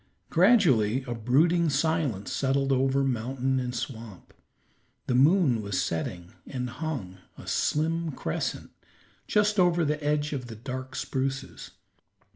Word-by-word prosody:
Gradually 145 - +4
a 120 -2 -4
brooding 155 +9 +2
silence 145 - 0
settled 135 0 +1
over 135 +1 +2
mountain 130 +1 -1
and 125 -1 -3
swamp. 110 -7 -7 0.7
The - - -1
moon 135 - +4
was 100 -2 -2
setting 85 +1 -3
and 125 -2 -4
hung, 130 - -5 0.2
a - - -11
slim 165 +2 0
crescent, 80 - -4 0.6
just 210 0 +2
over 175 -2 +3
the 150 0 -1
edge 150 0 0
of 130 -3 -4
the 115 - -8
dark 130 +3 -6
spruces. 135 +1 -3
135 Hz, 125 wpm, -27 LUFS, 120-155 Hz, 0.7 s, Gradually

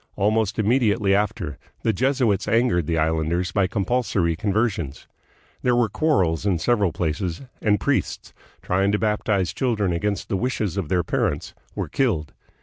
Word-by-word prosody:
Almost 105 0 +1
immediately 105 -3 +2
after, 100 -7 -1 0.2
the 110 - +2
Jesuits 125 -4 +1
angered 115 -9 +2
the 85 - 0
islanders 80 +3 0
by 100 -2 +2
compulsory 100 -4 0
conversions. 95 - -1 0.5
There 125 -1 +2
were 120 -3 +2
quarrels 95 - +1
in 100 -4 +1
several 100 +1 +1
places, 85 - -2 0.2
and 105 -1 +2
priests, - - -1 0.3
trying 95 +2 +1
to - - +3
baptize 105 -4 0
children 105 -7 0
against 100 +4 -2
the 95 - -1
wishes 110 -4 -1
of 95 -7 -3
their 90 -2 +2
parents, - - -1 0.2
were - - -2
killed. 90 - 0
100 Hz, 145 wpm, -23 LUFS, 85-110 Hz, 0.5 s, to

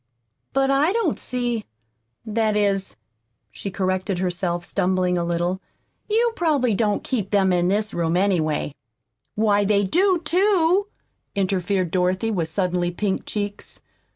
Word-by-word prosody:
But 270 0 +2
I 285 +5 +3
don't 435 -10 0
see 240 -3 -2 0.6
That 220 -1 0
is," 195 -2 0 0.6
she 200 - -6
corrected 185 0 -1
herself, 175 -1 -2
stumbling 185 -1 +1
a 175 - 0
little, 175 +2 -1 0.5
"you 460 +2 +3
probably 285 -9 +2
don't 210 0 0
keep 215 -7 -2
them 195 -3 +3
in 175 0 +2
this 210 +2 0
room, 170 0 0
anyway." 160 -7 +1 0.6
"Why, 210 -1 +3
they 200 0 +2
do, 365 - +2
too," 370 +2 +3 0.5
interfered 190 -2 0
Dorothy, 185 +4 +1
with 175 -6 -1
suddenly 180 0 0
pink 190 +2 -2
cheeks. 205 -1 -5
200 Hz, 130 wpm, -23 LUFS, 180-240 Hz, 0.6 s, I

